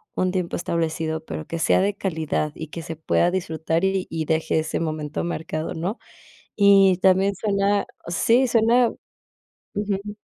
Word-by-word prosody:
un 185 0 +1
tiempo 180 -2 -2
establecido, 160 -2 -2
pero 155 - -6
que 165 - -4
sea 175 - +3
de 200 +1 +1
calidad, 160 -5 -2
y 160 - -6
que 165 +2 -7
se 165 - -6
pueda 170 +2 +1
disfrutar 165 -2 -1
y 185 -4 -1
deje 160 0 +1
ese 155 0 -2
momento 155 -2 -3
mercado, 160 -2 -3
¿no? 185 +8 -3 0.6
Y 195 -2 +6
también 190 +1 +3
suena, 200 0 +1 0.2
sí, 230 +9 +3
suena 235 +1 +4 0.9
ujú. 205 0 -3
175 Hz, 145 wpm, -23 LUFS, 160-200 Hz, 0.9 s, Y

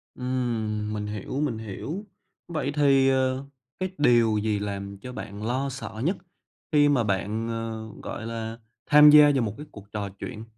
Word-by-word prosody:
Ừm, 115 -4 -2
mình 105 -1 -3
hiểu, 105 +6 -4
mình 135 -7 -1
hiểu. 140 - -6 0.4
Vậy 155 -4 -2
thì, 135 -2 +4
ờ, 130 0 +1 0.3
cái 185 0 -1
điều 120 -6 +4
gì 105 -1 0
làm 100 -1 -5
cho 125 +4 -8
bạn 100 -3 -7
lo 130 +4 -1
sợ 120 -4 -7
nhất 185 +4 +1 0.5
khi 145 -1 +5
mà 130 -5 +3
bạn, 105 +3 -1
ờ, 115 -1 -4 0.2
gọi 110 - -5
là, 115 0 -5 0.3
tham 150 0 +8
gia 150 -1 +8
vào 135 - +2
một 105 -2 -2
cái 150 - -8
cuộc 100 -1 -13
trò 100 -2 -3
chuyện? 110 -3 -6
115 Hz, 175 wpm, -26 LUFS, 105-135 Hz, 0.5 s, tham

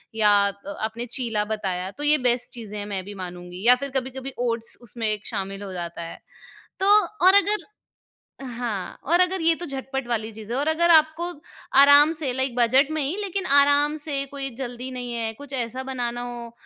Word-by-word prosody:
या 210 -2 +4 0.2
अ, 200 0 -9
आपने 225 +2 -3
चीला 230 -4 -1
बताया, 190 -4 -3
तो 290 - -5
ये 300 +1 +6
बेस्ट 245 0 0
चीज़ें 215 -3 -8
हैं, 205 - -4
मैं 195 -2 -3
भी 205 - -8
मानूँगी 180 +2 -9
या 250 - +8
फिर 280 +2 -5
कभी-कभी 265 +1 -4
ओट्स 230 -1 -1
उसमें 230 -1 -4
एक 210 -1 -4
शामिल 195 -2 -4
हो 195 -2 -7
जाता 170 -1 -6
है। 165 - -8 0.6
तो 385 - +1 0.4
और 375 - +8
अगर 410 +1 +3 0.8
हाँ, 235 -6 -5
और 340 +5 +2
अगर 365 0 +1
ये 330 0 +4
तो 350 - -3
झटपट 270 -1 -5
वाली 225 -2 -2
चीज़ 220 +1 -10
है - - -1
और 290 - -1
अगर 340 +2 +2
आपको 320 +2 +3 0.5
आराम 285 +2 +8
से 275 -5 -2
लाइक 260 -1 -1
बजट 260 +4 +3
में 310 -1 -1
ही, 285 +7 0
लेकिन 390 -1 -3
आराम 285 +1 +4
से, 280 -2 -2
कोई 275 0 -4
जल्दी 250 -1 -6
नहीं 245 -1 -4
है, 225 -1 -1
कुछ 285 +4 -12
ऐसा 255 0 -3
बनाना 245 -2 -3
हो 240 -1 -6
245 Hz, 200 wpm, -24 LUFS, 220-285 Hz, 0.8 s, या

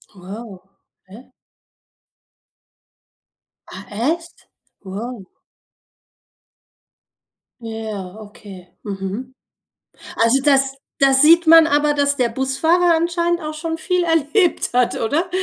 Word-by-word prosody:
Wow. 195 +1 -10 0.5
Okay. 230 +8 -15 2.4
Ah, - - -11
echt? 320 +11 -4 0.4
Wow. 205 +2 -7 2.4
Ja, 215 -4 -6
okay. 205 -3 -13 0.2
Mhm. 200 +6 -6 0.8
Also, 230 +4 +2
das 270 -1 +2 0.2
da 275 -1 +5
sieht 320 +5 +5
man 325 0 +8
aber, 295 -1 +2
dass 285 -1 0
der 250 -3 +1
Busfahrer 320 +8 +1
anscheinend 340 +1 0
auch 305 0 -5
schon 325 +1 -4
viel 360 +1 -1
erlebt 325 +2 +1
hat, 245 0 +1
oder? 300 +10 -1
270 Hz, 95 wpm, -19 LUFS, 220-325 Hz, 2.4 s, man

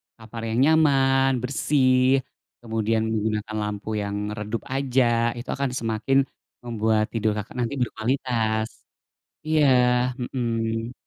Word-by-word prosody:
kamar 115 0 -9
yang 115 +2 0
nyaman, 135 -3 +4
bersih, 130 0 +2 0.4
kemudian 110 -1 0
menggunakan 110 0 -2
lampu 105 +1 -5
yang 100 0 -3 0.2
redup 105 +2 -4
aja, 135 -1 +2 0.3
itu 120 +2 -8
akan 140 -1 -1
semakin 115 +4 0 0.5
membuat 110 -2 +1
tidur, 110 -1 +1
Kakak, 105 - -6
nanti 120 +2 -1
berkualitas 110 -2 -1 0.8
iya, 155 0 +2 0.6
mhm. 115 -2 -2
115 Hz, 110 wpm, -24 LUFS, 110-135 Hz, 0.8 s, nyaman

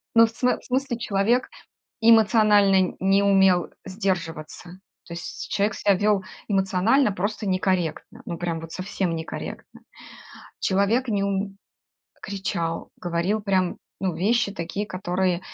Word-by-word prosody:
ну, 230 0 +8
в 225 - -5
смы 250 +2 +1
в - - -20
смысле, 260 -1 -1
человек 225 +4 +1 0.5
эмоционально 210 -4 +5
не 195 +1 +3
умел 190 -3 +4 0.2
сдерживаться. 180 -4 -4 0.3
То 170 - -9
есть 170 - -7
человек 205 0 +1
себя 200 0 +3
вёл 205 0 +2 0.3
эмоционально 195 +6 +2
просто 205 +3 -3
некорректно, 185 -4 -1
ну, 170 -2 -5
прям 170 -1 -3
вот 165 0 -9
совсем 185 -2 -2
некорректно. 160 0 -7 0.8
Человек 200 +7 +1
не 200 -2 0
ум 200 0 -2 0.7
кричал, 190 -5 -3
говорил 175 +5 -1
прям, 190 -3 0 0.2
ну, 185 -3 -1
вещи 210 +2 +1
такие, 195 +3 -4
которые 185 -1 -1
195 Hz, 125 wpm, -24 LUFS, 180-210 Hz, 0.8 s, ну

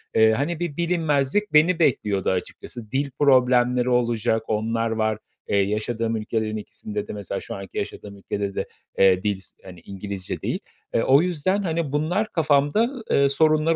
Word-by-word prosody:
Eee, 110 0 +6
hani, 150 +8 -1
bir 170 -4 -3
bilinmezlik 165 +1 0
beni 165 +3 +5
bekliyordu 105 - +1
açıkçası. 105 +4 -5
Dil 140 +1 0
problemleri 125 -2 +4
olacak, 120 -2 +1
onlar 115 +1 0
var. 110 -1 0 0.3
Eee, 100 - +1
yaşadığım 110 +3 0
ülkelerin 110 0 -2
ikisinde 105 0 -6
de - - -6
mesela 100 -1 -4
şu - - -7
anki 95 -1 -9
yaşadığım 100 -1 -5
ülkede 100 0 -4
de, - - -2 0.3
eee, 95 -1 +4
dil, 100 -2 -1 0.2
hani, 90 -2 -11
İngilizce 100 +1 -6
değil. - - -2 0.3
Eee, 115 - +2
o 135 +3 +5
yüzden, 180 +3 0
hani, 165 -4 -1
bunlar 165 +9 0
kafamda, 165 - +2
eee, 140 0 +4
sorunlar 155 +3 +3
125 Hz, 155 wpm, -24 LUFS, 105-155 Hz, 0.3 s, Eee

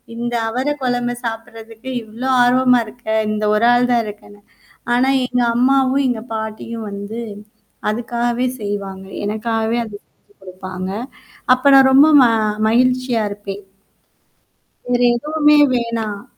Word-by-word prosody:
இந்த 240 +1 -4 0.2
அவர 255 +5 -3 0.2
குழம்ப 245 -1 -1
சாப்படுறதுக்கு 225 +1 -7
இவ்ளோ 225 +4 -6 0.2
ஆர்வமா 250 0 +4
இருக்க. 235 +2 -16 0.2
இந்த 215 0 -3
ஒரு 215 +2 +2
ஆள் 245 0 +2
தான் 235 -1 +2
இருக்கன்னு. 205 0 -11 0.5
ஆனா 250 +2 +2 0.2
எங்க 250 0 -1
அம்மாவும், 265 +2 +2
எங்க 235 -3 -2
பாட்டியும் 220 +1 -6
வந்து 205 +3 -6 0.7
அதுக்காகவே 240 +2 -1 0.2
செய்வாங்க. 195 -2 -5 0.2
எனக்காகவே 225 +2 -1
அது. 210 -2 -9 0.4
குடுப்பாங்க. 185 0 -7 0.6
அப்ப 255 +2 -4
நான் 270 -1 +7
ரொம்ப 275 +3 +7
ம - - +7 0.4
மகிழ்ச்சியா 255 0 +1
இருப்பேன். 200 0 -7 1.2
வேற 245 0 0
எதுவுமே 300 +3 +2
வேணாம்? 230 -4 -2
235 Hz, 115 wpm, -18 LUFS, 215-250 Hz, 1.2 s, நான்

